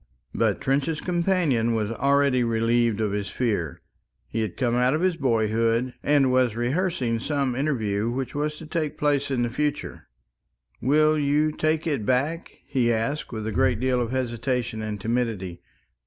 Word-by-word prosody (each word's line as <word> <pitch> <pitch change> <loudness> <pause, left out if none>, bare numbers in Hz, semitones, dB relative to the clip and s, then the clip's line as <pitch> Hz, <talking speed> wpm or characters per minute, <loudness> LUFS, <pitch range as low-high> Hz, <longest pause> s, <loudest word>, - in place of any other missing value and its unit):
But - - +1
Trench's 140 +4 0
companion 170 -10 +1
was 110 -1 -1
already 140 0 +2
relieved 115 -1 +1
of 105 -2 0
his 100 -1 -2
fear. 100 - -2 0.4
He 115 - -2
had 110 -5 -4
come 120 -3 +1
out 125 +3 +3
of 155 - -1
his 185 -1 +2
boyhood, 115 -1 +1
and 140 -3 +3
was 125 -3 +2
rehearsing 125 -2 0
some 140 0 -1
interview 115 -6 -1
which 130 +1 -3
was 150 +1 -2
to 160 - -10
take 155 -1 -3
place 145 -1 +1
in 125 -3 0
the 120 - 0
future. 150 +3 -3 0.7
"Will 155 +4 +3
you 150 +2 +2
take 155 +1 0
it 145 -9 -1
back?" 140 +9 0
he 125 -3 +1
asked, 115 +7 -2
with 110 -2 -5
a 110 - -2
great 105 - +2
deal 125 0 +1
of 120 - -2
hesitation 120 -2 -2
and 105 -1 -4
timidity. 110 -6 -2
125 Hz, 165 wpm, -25 LUFS, 115-145 Hz, 0.7 s, out